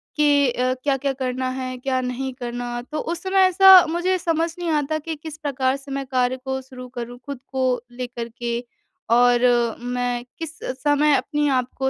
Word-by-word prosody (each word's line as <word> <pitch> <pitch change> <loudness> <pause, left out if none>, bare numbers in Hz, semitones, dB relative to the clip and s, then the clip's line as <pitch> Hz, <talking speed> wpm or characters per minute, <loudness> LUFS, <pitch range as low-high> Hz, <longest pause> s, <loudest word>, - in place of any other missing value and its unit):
कि 290 -2 +4
अ, 255 +1 0
क्या-क्या 275 -1 0
करना 255 -1 -2
है? 255 0 -4
क्या 260 +1 -1
नहीं 255 +1 -3
करना, 245 -1 -5
तो 305 +5 -6
उस 340 +1 -3
समय 380 0 +4
ऐसा 375 0 +8
मुझे 350 +3 +1
समझ 330 -2 0
नहीं 345 -1 -2
आता 305 0 0
कि 320 +1 -5
किस 310 +1 -9
प्रकार 270 -4 0
से 275 0 -12
मैं 275 0 -3
कार्य 255 -1 0
को 265 0 -2
शुरू 255 -1 -10
करूँ, 240 0 -5
खुद 280 -3 -6
को 260 -2 0
लेकर 240 -1 -6
के। 235 -1 -2 0.5
और 245 0 +5 0.4
मैं 245 0 -2 0.2
किस 325 -1 -6 0.3
समय 295 0 +3
अपने 295 0 0
आप 255 -2 +1
को 265 0 +1
265 Hz, 180 wpm, -22 LUFS, 250-300 Hz, 0.5 s, ऐसा